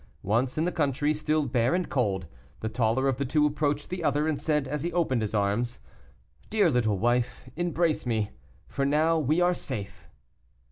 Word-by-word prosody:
Once 120 +7 0
in 160 - +1
the 180 - 0
country, 145 -1 +1
still 155 0 0
bare 125 +2 +1
and 180 -2 -1
cold, 100 -8 0 0.4
the 110 - -2
taller 115 +3 +1
of 135 -2 +1
the 140 - -1
two 150 +3 +2
approached 145 0 -1
the 180 -2 -3
other, 150 0 +1
and 150 -3 -1
said, 150 -3 0
as 150 +1 -3
he 175 - -2
opened 155 -9 +1
his 110 0 -2
arms: 105 +4 0 0.7
"Dear 205 -6 +3
little 110 -5 +1
wife, 120 +4 0
embrace 170 -4 0
me, 110 -3 0 0.4
for 140 - -2
now 155 +4 +3
we 155 +4 +1
are 175 0 +4
safe." 105 - -6
140 Hz, 185 wpm, -27 LUFS, 120-155 Hz, 0.7 s, are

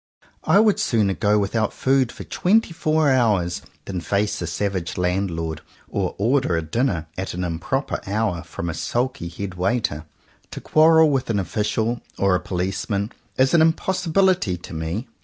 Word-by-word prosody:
I - - +5
would 215 -2 +4
sooner 105 -5 +2
go 105 +1 +2
without 105 +2 0
food 130 -2 +2
for - - -9
twenty 205 0 +1
four 155 -2 +2
hours 105 -9 +2 0.2
than 95 -3 -4
face 100 +3 -1
a 85 - -2
savage 95 0 -2
landlord, 90 -3 -1 0.3
or 95 -3 -2
order 115 -4 +2
a 80 - -1
dinner 85 - -1
at 95 -2 -4
an 90 - -3
improper 110 - -2
hour 100 -4 -1
from 85 0 -6
a 80 - -2
sulky 125 - -2
head 95 +2 -6
waiter. 90 -5 -1 0.4
To - - -7
quarrel 160 0 +5
with 130 -3 -1
an 110 - +1
official 110 +4 -1 0.2
or 100 -1 +2
a 90 - +2
policeman 95 +3 -2 0.3
is 130 0 +3
an 170 - +6
impossibility 175 - +2
to 85 - -11
me. 80 - -3
105 Hz, 160 wpm, -22 LUFS, 90-135 Hz, 0.4 s, an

